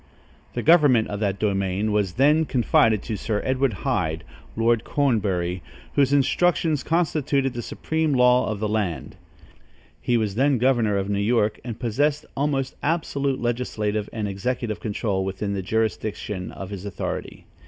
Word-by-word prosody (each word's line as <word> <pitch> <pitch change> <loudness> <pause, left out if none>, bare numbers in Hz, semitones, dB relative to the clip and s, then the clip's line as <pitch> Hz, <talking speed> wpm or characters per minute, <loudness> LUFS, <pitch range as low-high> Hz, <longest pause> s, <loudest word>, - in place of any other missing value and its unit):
The - - -2
government 145 -9 +5
of 100 - -4
that 100 -2 0
domain 100 0 0
was 100 -4 0
then 150 - +4
confided 115 -5 +2
to 110 - -3
Sir 105 +1 -2
Edward 130 -1 +1
Hyde 80 +1 0 0.3
(Lord 115 0 +2
Cornbury), 95 - 0 0.3
whose 140 -1 +3
instructions 155 +2 +2
constituted 145 -5 0
the 120 - -4
supreme 160 +6 -2
law 125 0 +4
of 105 -2 -3
the 110 - -1
land. 105 -6 -2 0.9
He 120 - +1
was 110 -3 -1
then 135 +4 +2
governor 120 -4 +2
of 95 0 -1
New 100 0 -1
York 105 0 +1
and 115 -2 -6
possessed 145 +5 0
almost 135 -2 -1
absolute 140 -4 -1
legislative 110 -3 -2
and 110 -2 -3
executive 110 +3 -3
control 105 -3 -2
within 95 +2 -3
the 100 - -2
jurisdiction 105 -2 -2
of 95 0 -8
his 100 -2 -6
authority. 100 -3 -5
115 Hz, 150 wpm, -24 LUFS, 100-135 Hz, 0.9 s, government